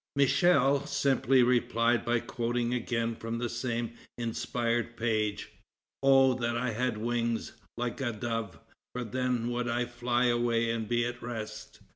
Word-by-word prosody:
'" - - -64
Michel 140 0 +3
simply 135 -2 +3
replied 120 -1 +2
by 120 0 +1
quoting 120 +1 -2
again 115 -1 -1
from 115 +1 -4
the 120 +1 -1
same 120 -1 -2 0.3
inspired 120 0 -2
page: 110 -3 -1 0.5
"Oh 135 -1 +6
that 120 0 0
I 125 0 -1
had 120 0 -1
wings 115 +1 -1 0.3
like 120 +2 -3
a 125 -3 0
dove; 115 -5 -4 0.4
for 125 - -3
then 120 0 -1
would 120 0 -1
I 120 +1 0
fly 120 +1 0
away 120 -1 +2
and 115 -2 -2
be 120 +1 +1
at 120 0 -5
rest." 110 -3 -7
120 Hz, 150 wpm, -30 LUFS, 115-125 Hz, 0.5 s, Oh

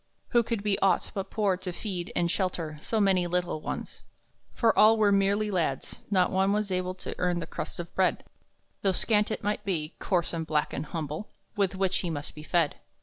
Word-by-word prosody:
Who 240 - +5
could 230 -3 -2
be 205 -2 +1
aught 195 - +2
but 195 0 -4
poor 205 -4 +1
to 185 0 -5
feed 180 -1 -4
and 170 -1 +2
shelter 170 -6 -2
So 220 - -1
many 190 -3 +3
little 175 -3 -1
ones? - - -5 0.5
For 230 -2 +2
all 220 +1 +7
were 210 -2 +4
merely 200 +2 +2
lads; 160 -8 -1
not 185 -3 +3
one 190 +1 +3
was 210 -1 0
able 185 0 -1
To 185 - -6
earn 180 -1 +1
the 165 - -4
crust - - -6
of 170 -1 -6
bread, 190 -1 +2 0.6
Though 195 -1 +2
scant 210 +2 +2
it 215 - -3
might 210 0 -1
be, 165 -6 -2
coarse 175 -4 0
and 165 -1 -3
black 150 -2 0
and 145 +2 -3
humble, 160 +3 -4 0.3
With 200 -2 +1
which 190 -1 +1
he 175 - -2
must 145 -2 -4
be 150 - -9
fed. 160 -1 +1
185 Hz, 205 wpm, -28 LUFS, 170-205 Hz, 0.6 s, all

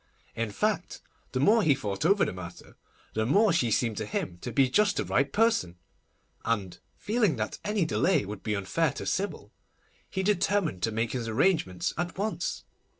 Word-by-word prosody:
In 115 -1 -1
fact, 100 - -1 0.3
the 130 - -1
more 215 - +5
he 150 -8 +4
thought 105 +2 -2
over 200 +2 +4
the - - -3
matter, 90 -1 -10 0.4
the 110 - 0
more 195 - +4
she 125 -8 +2
seemed 115 0 +1
to 110 - -2
him 90 -4 -3
to 120 - -5
be 135 +1 +4
just 205 +10 +2
the - - 0
right 135 +2 +1
person, 205 - +2 0.7
and, 105 -5 -2 0.2
feeling 210 - +1
that 110 -2 -3
any 205 -4 0
delay 170 - +2
would 100 0 -7
be 105 -1 -1
unfair 135 - 0
to - - -6
Sybil, 200 +2 -2 0.6
he 190 - -2
determined 195 - +1
to 115 - 0
make 115 +1 -1
his 120 -3 -3
arrangements 115 - +1
at 175 0 -3
once. 210 +3 -2
135 Hz, 180 wpm, -28 LUFS, -, 0.7 s, more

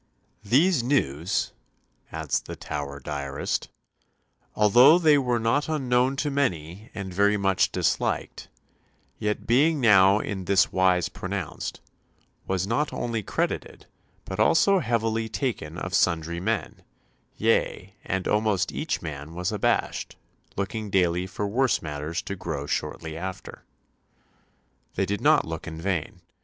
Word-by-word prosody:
"These 140 - +3
news," 90 - 0 0.6
adds - - -1
the - - -8
Tower 70 -1 -5
diarist, 70 0 -3 0.9
"although 120 +9 +7
they 155 -4 +5
were 125 -3 +1
not 115 +7 +1
unknown 130 -3 +1
to 145 +1 -1
many 100 - -2
and 95 -3 -5
very 100 +2 +3
much 95 -2 +2
disliked, - - -1 0.7
yet 105 0 -2
being 145 +6 +3
now 100 -4 +6
in 100 -3 -4
this 95 0 +3
wise 90 -2 +3
pronounced, 95 -3 -5 0.7
was 95 -1 0
not 120 +8 0
only 115 -2 -2
credited, - - -3 0.4
but - - -6
also 195 +4 +4
heavily 115 -4 0
taken 110 - -3
of 95 +1 -5
sundry 85 -2 +1
men; 100 - -2 0.6
yea, 95 +3 0
and 95 0 -2
almost 105 -3 +1
each 155 - -3
man 75 0 -7
was 90 +2 -2
abashed, 105 - -1 0.4
looking 105 +2 -3
daily 90 -1 +1
for 100 +2 -3
worse 125 +5 +2
matters 75 +3 -4
to 100 - -5
grow 80 -7 -4
shortly 80 +2 -3
after." 95 +3 -7 1.3
They - - +1
did 100 0 -3
not - - +4
look 80 0 -6
in 80 0 -6
vain. 90 -2 -3
100 Hz, 130 wpm, -26 LUFS, 85-120 Hz, 1.3 s, although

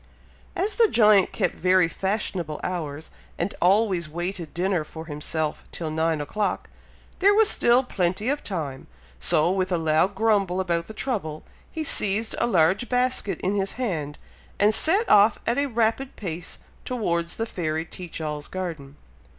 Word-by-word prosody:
As 410 +4 -1
the 460 -2 +6
giant 210 - +4
kept - - -1
very 185 -1 +3
fashionable 185 -4 -2
hours, 160 -4 -4 0.3
and 175 +4 -2
always 185 -3 +2
waited 175 +1 -4
dinner 180 -1 0
for 160 +1 -9
himself 150 0 -3
till 160 -2 -4
nine 160 0 0
o'clock, 205 +8 -3 0.5
there 400 +2 +5
was 440 0 +5
still 240 +2 +4
plenty 190 -2 -1
of 285 +2 -1
time; 150 -9 -5 0.3
so, 165 0 +3
with 185 0 -1
a 175 - +2
loud 160 +4 +1
grumble 200 -4 +1
about 170 -2 -1
the 220 - -9
trouble, 185 - -3 0.3
he 320 - -4
seized 215 -5 +2
a - - +2
large 185 +3 +2
basket 250 -4 0
in 190 - 0
his 195 -1 -1
hand, 160 - -3 0.4
and 210 +2 +4
set 385 - +4
off 210 +1 +5
at 235 +3 +1
a 285 - +1
rapid 235 +2 0
pace 170 -4 -6 0.3
towards 170 -9 -2
the 225 - -1
fairy 160 -6 -3
Teach 175 0 -8
all's 150 -2 -4
garden. 160 -7 -6
185 Hz, 160 wpm, -24 LUFS, 165-220 Hz, 0.5 s, the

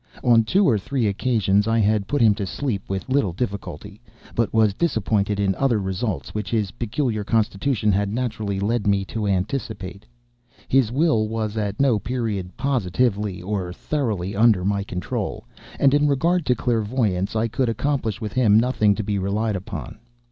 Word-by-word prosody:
On 115 -2 +5
two 190 - +3
or 110 -5 +3
three 125 +3 -1
occasions 105 -1 +1
I 115 0 +2
had 105 -2 +2
put 145 +3 +1
him 110 -2 +6
to 100 -2 -4
sleep 100 +2 -2
with 95 -1 -3
little 130 -9 +1
difficulty, 100 -1 -5 0.3
but 115 -3 0
was 110 -3 +3
disappointed 105 - 0
in 100 -1 +2
other 125 +2 +1
results 95 - -3
which 105 -2 -3
his 105 -4 0
peculiar 115 -2 -2
constitution 110 +1 +1
had 100 +1 0
naturally 110 -4 -2
led 105 +1 0
me 100 -1 +2
to 105 +1 -3
anticipate. 100 0 -3 0.6
His 130 -4 +3
will 135 -6 +2
was 110 -1 -3
at 105 -2 -2
no 130 -6 +3
period 110 -7 -3
positively, 105 -6 0
or 95 -2 -3
thoroughly, 105 -5 -2
under 105 -4 +4
my 100 0 0
control, 90 -3 -4 0.3
and 140 -1 +4
in 145 0 +4
regard 165 +4 +1
to 125 - +3
clairvoyance, 110 -4 0
I 110 +1 +1
could 120 +2 0
accomplish 115 -2 -1
with 105 -3 -5
him 110 -4 +5
nothing 115 -4 +2
to 110 - -3
be 100 -1 -1
relied 105 +3 -1
upon. 95 +1 -6
110 Hz, 170 wpm, -23 LUFS, 100-120 Hz, 0.6 s, him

